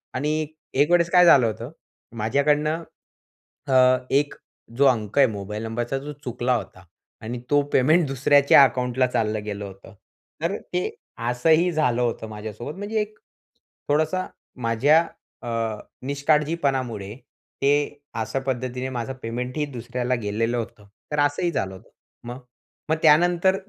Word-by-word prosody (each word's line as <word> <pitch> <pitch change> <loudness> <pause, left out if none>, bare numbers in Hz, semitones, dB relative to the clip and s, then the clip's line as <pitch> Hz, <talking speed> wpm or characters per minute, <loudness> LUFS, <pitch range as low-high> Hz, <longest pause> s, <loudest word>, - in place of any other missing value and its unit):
आणि 150 +4 0
एक 155 +1 -7 0.3
एक 150 - +2
वेळेस 170 -1 +4
काय 180 -1 +7
झालं 135 -8 +7
होतं, 110 - -5 0.5
माझ्याकडनं, 150 +8 +1 0.8
अ, 135 - 0 0.4
एक 145 +1 +1 0.4
जो 140 - +4
अंक 110 -2 0
आहे 135 -2 +7
मोबाईल 105 +1 -5
नंबरचा 120 +3 -2
जो 145 +2 -7
चुकला 125 0 0
होता 95 -5 -6 0.4
आणि 120 +2 -5
तो 145 0 +4
पेमेंट 155 +6 +4
दुसऱ्याच्या 140 +1 +5
अकाउंटला 125 0 +1
चाललं 110 -4 -1
गेलं 100 -1 -5
होतं. 95 +2 -12 0.5
तर 175 +5 0 0.2
ते 180 0 +1 0.5
असंही 160 +8 +3
झालं 125 -7 +1
होतं 115 -2 -2
माझ्यासोबत. 110 - -7
म्हणजे 210 +2 -2
एक 210 0 -6 0.7
थोडासा 155 +5 +1 0.4
माझ्या 145 +9 +4 0.4
अ, 120 - -5 0.6
निष्काळजीपणामुळे 140 -7 0 0.5
ते 140 - +3 0.5
अशा 125 +4 -2
पद्धतीने 130 0 -2
माझं 120 +2 -3
पेमेंटही 125 +6 -3
दुसऱ्याला 125 -1 -3
गेलेलं 115 +4 -1
होतं. 110 -3 -6 0.2
तर 150 - -1
असंही 145 +4 +1
झालं 95 - -2
होतं. 100 - -16 0.4
मग 125 +2 -6 0.5
मग 160 - +3
त्यानंतर 175 +4 +4
130 Hz, 135 wpm, -24 LUFS, 115-150 Hz, 0.8 s, काय